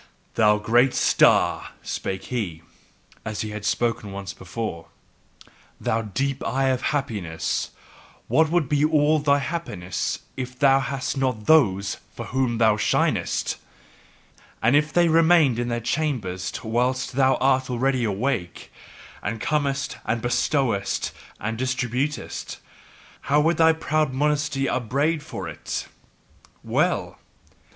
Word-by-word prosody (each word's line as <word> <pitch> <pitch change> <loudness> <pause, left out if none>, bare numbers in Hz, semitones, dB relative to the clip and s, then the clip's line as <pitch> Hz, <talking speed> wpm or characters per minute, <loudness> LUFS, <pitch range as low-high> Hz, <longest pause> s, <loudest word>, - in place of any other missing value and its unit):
"Thou 105 -1 +4
great 120 +5 +3
star," - - +3
spake 95 0 -4
he, 85 -9 -3 0.6
as 110 0 -4
he 110 -2 -4
had 105 0 -6
spoken 115 -1 -1
once 100 0 -6
before, 95 -2 -6 0.9
"thou 115 - 0
deep 130 +6 -2
eye 135 +1 +1
of 130 -1 0
happiness, 105 - -2 0.6
what 155 +7 +3
would 170 -3 +1
be 145 +1 +1
all 155 0 +3
thy 145 -1 +3
happiness 135 - -3 0.2
if 125 -1 -6
thou 135 -1 +5
hadst 140 +1 -3
not 125 -5 -1
THOSE 100 -11 +3 0.2
for - - -6
whom 130 -2 0
thou 110 -2 +4
shinest! - - 0 1.0
And 115 +5 +3
if 150 +1 +2
they 175 -1 +4
remained 160 -6 +4
in 120 - -1
their 120 -1 -1
chambers 115 -8 -2
whilst 125 +3 0
thou 135 0 +3
art 130 -1 +2
already 130 +1 +1
awake, 105 -3 -2 0.5
and 115 - -3
comest 140 -3 -1
and 115 - -1
bestowest 120 -3 0 0.3
and 110 +2 -3
distributest, 130 +3 -2 0.7
how 145 +2 +5
would 165 +2 +2
thy 160 0 +6
proud 155 -3 0
modesty 145 0 0
upbraid 140 +7 0
for 95 - -6
it! 80 - -5 0.8
Well! - - 0
130 Hz, 125 wpm, -24 LUFS, 110-145 Hz, 1.0 s, thy